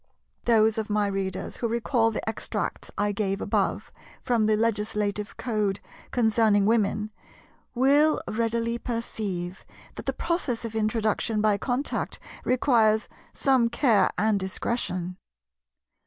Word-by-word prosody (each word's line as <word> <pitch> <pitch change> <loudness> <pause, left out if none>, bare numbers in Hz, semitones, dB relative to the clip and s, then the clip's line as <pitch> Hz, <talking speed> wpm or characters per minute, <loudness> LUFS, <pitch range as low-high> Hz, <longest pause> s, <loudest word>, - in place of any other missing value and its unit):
Those 220 -1 +4
of 215 - -4
my 210 0 +2
readers 195 -2 -3
who 235 - -1
recall 230 0 +1
the 220 - -4
extracts 220 - -3
I 205 0 +1
gave 195 -1 -1
above - - -1 0.3
from 230 -3 +2
the 215 - +4
Legislative 210 -2 -1
code 210 -5 -1 0.3
concerning 220 -3 +3
Women, 215 -1 +1 0.6
will 285 +5 +4
readily 230 +1 -1
perceive 205 -7 -4 0.3
that - - -9
the - - +3
process 265 -9 -2
of 225 - -5
introduction 220 0 0
by 210 -1 +2
contact 255 +6 -2 0.3
requires 230 -4 +3 0.2
some 260 -4 +2
care 235 -3 +3
and 215 -1 +2
discretion. 185 -2 -2
220 Hz, 120 wpm, -26 LUFS, 205-235 Hz, 0.6 s, Those